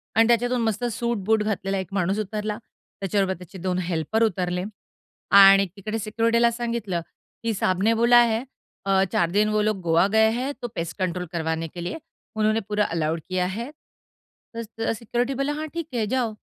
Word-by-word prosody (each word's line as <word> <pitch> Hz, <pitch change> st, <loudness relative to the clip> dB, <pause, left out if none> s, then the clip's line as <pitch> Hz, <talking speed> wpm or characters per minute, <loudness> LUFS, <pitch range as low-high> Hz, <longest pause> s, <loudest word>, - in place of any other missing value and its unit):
आणि 225 Hz, +1 st, +5 dB
त्याच्यातून 240 Hz, +1 st, +2 dB
मस्त 225 Hz, +1 st, -1 dB
सूट 235 Hz, 0 st, -1 dB
बूट 220 Hz, 0 st, +3 dB
घातलेला 195 Hz, -2 st, -1 dB
एक 190 Hz, -, -4 dB
माणूस 195 Hz, +1 st, 0 dB
उतरला. 210 Hz, 0 st, -3 dB, 0.4 s
त्याच्याबरोबर 195 Hz, -1 st, 0 dB
त्याचे 180 Hz, +1 st, -11 dB
2 185 Hz, 0 st, -1 dB
हेल्पर 175 Hz, +7 st, 0 dB
उतरले 180 Hz, -3 st, 0 dB, 0.7 s
आणि 195 Hz, 0 st, +8 dB
तिकडे 215 Hz, +3 st, -4 dB
सिक्युरिटीला 230 Hz, +2 st, +2 dB
सांगितलं, 230 Hz, -6 st, -2 dB, 0.4 s
की 230 Hz, -1 st, 0 dB
साहब 185 Hz, -1 st, 0 dB
ने 225 Hz, +2 st, +4 dB
बोला 235 Hz, +1 st, +6 dB
है, 225 Hz, +1 st, 0 dB, 0.4 s
अ, 195 Hz, -1 st, +3 dB
4 170 Hz, -1 st, +2 dB
दिन 210 Hz, +2 st, +2 dB
वो 215 Hz, 0 st, +1 dB
लोग 210 Hz, -3 st, 0 dB
गोवा 170 Hz, +2 st, +3 dB
गए 220 Hz, 0 st, +5 dB
है, 255 Hz, +4 st, -2 dB
तो 240 Hz, -, -3 dB
पेस्ट 165 Hz, +1 st, -4 dB
कंट्रोल 180 Hz, -1 st, -1 dB
करवाने 160 Hz, -1 st, -2 dB
के 175 Hz, +2 st, -8 dB
लिए 180 Hz, -, -4 dB, 0.4 s
उन्होंने 215 Hz, +1 st, +2 dB
पूरा 210 Hz, 0 st, +1 dB
अलाऊड 160 Hz, 0 st, -1 dB
किया 185 Hz, -1 st, 0 dB
है. 230 Hz, +8 st, -5 dB, 0.8 s
तर 230 Hz, -, -3 dB
स 225 Hz, +1 st, -3 dB
सिक्युरिटी 240 Hz, +3 st, -1 dB
बोलला 275 Hz, +1 st, 0 dB
हां, 310 Hz, +1 st, -4 dB
ठीक 335 Hz, -2 st, -4 dB
है 225 Hz, -3 st, 0 dB
जाओ. 245 Hz, -4 st, 0 dB
210 Hz, 180 wpm, -24 LUFS, 185-230 Hz, 0.8 s, आणि